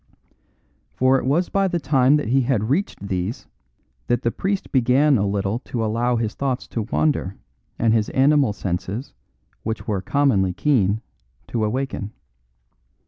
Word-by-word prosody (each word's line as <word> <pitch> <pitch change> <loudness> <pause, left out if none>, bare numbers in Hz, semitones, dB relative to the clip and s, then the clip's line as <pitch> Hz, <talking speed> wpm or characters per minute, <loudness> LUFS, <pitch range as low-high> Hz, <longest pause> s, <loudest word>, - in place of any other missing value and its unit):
For 130 +1 +3
it - - -5
was 165 +7 +1
by 195 -1 +2
the 175 -2 -1
time 135 -2 +3
that 150 -7 -1
he 135 +2 +3
had 120 -3 0
reached 145 - -1
these 95 +4 -3 0.6
that 120 - 0
the 115 - +1
priest 195 - -3
began 135 +3 +4
a 100 -3 +1
little 100 +3 -1
to 115 -3 -2
allow 120 +3 0
his 115 -2 -1
thoughts 135 -2 -2
to 115 - -2
wander 105 -4 -1 0.4
and 115 -1 +2
his 110 -2 +1
animal 140 -2 +3
senses, 95 +5 -4 0.5
which 110 0 -4
were 100 -3 -1
commonly 105 -9 +2
keen, 110 -5 +1 0.5
to 115 -2 -1
awaken. 110 -2 -3
120 Hz, 150 wpm, -22 LUFS, 105-140 Hz, 0.6 s, began